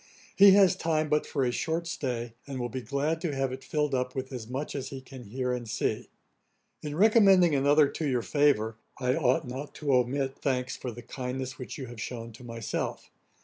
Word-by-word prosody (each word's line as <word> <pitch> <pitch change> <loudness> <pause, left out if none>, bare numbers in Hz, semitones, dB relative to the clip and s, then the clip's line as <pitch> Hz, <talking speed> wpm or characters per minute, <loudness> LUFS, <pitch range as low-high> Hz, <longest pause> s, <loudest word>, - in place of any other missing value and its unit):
He 200 0 +9
has 195 -2 +6
time 155 -4 0
but 150 0 +1
for 135 -3 0
a 120 - +1
short 165 +6 -1
stay, 120 -7 -3
and 135 -2 -5
will 120 0 -2
be 130 +2 -4
glad 145 +5 -1
to 160 -6 -2
have 135 -1 0
it 130 - -8
filled 150 -2 -1
up 125 0 -1
with 130 0 -4
as 120 -4 -6
much 135 +5 -4
as 135 -2 -4
he 135 0 -6
can 130 -1 -11
hear 125 +4 -2
and 120 -2 -4
see. 115 - -2 0.7
'In 150 -1 -5
recommending 195 -4 +6
another 145 +2 +5
to 155 +2 -3
your 125 -3 0
favour, 135 -7 +2 0.2
I 125 -1 +1
ought 130 -5 +2
not 135 +4 -6
to 145 -3 0
omit 135 +2 +1
thanks 130 -2 -1
for 125 - -5
the 120 +1 -10
kindness 130 +2 -5
which 125 - -6
you 135 - -5
have 120 -2 -9
shewn 115 -1 -5
to 115 +3 -13
myself. 115 -2 -4
135 Hz, 210 wpm, -28 LUFS, 125-150 Hz, 0.7 s, He